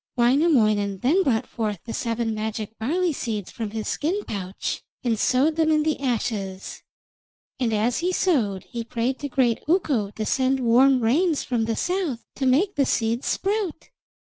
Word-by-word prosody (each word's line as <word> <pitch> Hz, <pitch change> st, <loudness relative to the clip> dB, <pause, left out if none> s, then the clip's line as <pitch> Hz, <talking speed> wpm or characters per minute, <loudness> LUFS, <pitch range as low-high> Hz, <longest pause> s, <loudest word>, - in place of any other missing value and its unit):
Wainamoinen 235 Hz, -, +3 dB
then 320 Hz, +10 st, +3 dB
brought 240 Hz, -10 st, +1 dB
forth 215 Hz, -5 st, -3 dB
the 230 Hz, -, -5 dB
seven 230 Hz, -1 st, -1 dB
magic 220 Hz, 0 st, -4 dB
barley 335 Hz, +9 st, 0 dB
seeds 215 Hz, -7 st, -4 dB
from 225 Hz, -3 st, -4 dB
his 215 Hz, 0 st, -4 dB
skin 370 Hz, +8 st, -1 dB
pouch, 190 Hz, -2 st, -4 dB, 0.2 s
and 230 Hz, -4 st, 0 dB
sowed 285 Hz, +8 st, +2 dB
them 320 Hz, -1 st, +3 dB
in 305 Hz, -1 st, +3 dB
the 310 Hz, -1 st, 0 dB
ashes, 215 Hz, -7 st, -3 dB, 0.8 s
and 245 Hz, -3 st, +1 dB
as 220 Hz, +3 st, +1 dB
he 355 Hz, +2 st, 0 dB
sowed 235 Hz, -, +1 dB
he 235 Hz, -1 st, -6 dB
prayed 235 Hz, +3 st, -2 dB
to 285 Hz, -, -4 dB
great 245 Hz, -4 st, +1 dB
Ukko 290 Hz, -, +1 dB
to 215 Hz, +1 st, -5 dB
send 265 Hz, +3 st, +1 dB
warm 255 Hz, +2 st, +4 dB
rains 300 Hz, +8 st, +2 dB
from 235 Hz, -3 st, -1 dB
the 225 Hz, 0 st, -1 dB
south 350 Hz, -, -2 dB
to 270 Hz, -, 0 dB
make 340 Hz, +11 st, +3 dB
the 280 Hz, -, +2 dB
seeds 230 Hz, +2 st, 0 dB
sprout. 395 Hz, -5 st, -2 dB
245 Hz, 170 wpm, -24 LUFS, 220-300 Hz, 0.8 s, warm